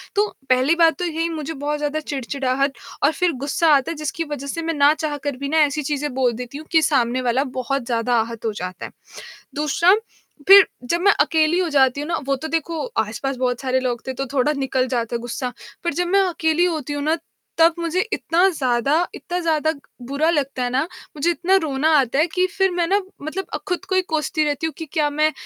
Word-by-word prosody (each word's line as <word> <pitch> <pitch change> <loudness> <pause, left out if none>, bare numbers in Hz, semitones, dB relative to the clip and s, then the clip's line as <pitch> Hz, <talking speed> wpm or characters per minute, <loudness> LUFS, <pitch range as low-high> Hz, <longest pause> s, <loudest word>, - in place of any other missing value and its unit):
तो 415 +1 +3 0.2
पहली 260 +5 +3
बात 330 -1 +4
तो 360 - -1
यही 330 0 -1
मुझे 320 -1 -4
बहुत 290 +1 -2
ज़्यादा 295 +1 -2
चिड़चिड़ाहट 275 -1 -2 0.3
और 285 - +5
फ़िर 355 +1 +1
गुस्सा 295 +4 +1
आता 275 +3 0
है 335 - -4
जिसकी 305 +2 -3
वजह 280 -1 -5
से 330 +4 -3
मैं 330 0 -2
ना 290 0 +5
चाह 305 -2 -3
कर 285 -3 -2
भी 280 +1 -4
ना 320 - +1
ऐसी 300 +1 0
चीज़ें 290 0 -2
बोल 255 -2 +2
देती 250 +4 -7
हूँ 310 - -9
कि 320 -1 +5
सामने 255 -4 +1
वाला 250 +2 +1 0.2
बहुत 270 0 -2
ज़्यादा 240 0 0
आहत 230 0 -6
हो 220 - +1
जाता 180 -2 -6
है। - - -9 0.6
दूसरा 305 +5 +3 0.5
फ़िर 390 0 +10 0.2
जब 340 - +2
मैं 405 +3 +5
अकेली 320 +1 +3
हो 360 -2 +1
जाती 270 -1 +3
हूँ 295 - -5
ना, 335 - 0
वो 275 - +1
तो 315 +4 -6
देखो 325 +2 -2
आस-पास 245 +5 -2
बहुत 250 -1 -1
सारे 260 -1 0
लोग 245 -2 -3
थे 260 - -2
तो 270 +1 -3
थोड़ा 280 +2 +2
निकल 265 -2 0
जाता 235 -2 -1
गुस्सा। 240 +2 -4 0.3
पर 340 - 0
जब 355 +3 0
मैं 395 +2 +4
अकेली 325 0 +1
होती 310 -5 -2
हूँ 290 0 -3
ना 310 +3 +1 0.4
तब 330 0 +5
मुझे 340 +2 -1
इतना 355 0 +2
ज़्यादा 265 -2 +1 0.2
इतना 355 0 -4
ज़्यादा 315 -2 +1 0.3
बुरा 285 +4 +1
लगता 275 -5 -1
है 245 - -1
ना, 260 +2 +1 0.3
मुझे 300 +4 +1
इतना 365 +3 +2
रोना 290 0 0
आता 270 +1 +1
है 315 - +4
कि 365 +3 0
फ़िर 385 +1 +1
मैं 350 -1 0
ना 395 +4 +2 0.2
मतलब 335 +6 -4
अ, - - +2
खुद 360 +1 -2
को 375 - -3
ही 375 - +3
कोसती 310 -2 -1
रहती 295 +1 -1
हूँ 320 - -3
कि 325 - -5
क्या 300 -2 +2
मैं 305 +1 +2
295 Hz, 225 wpm, -21 LUFS, 265-330 Hz, 0.6 s, फ़िर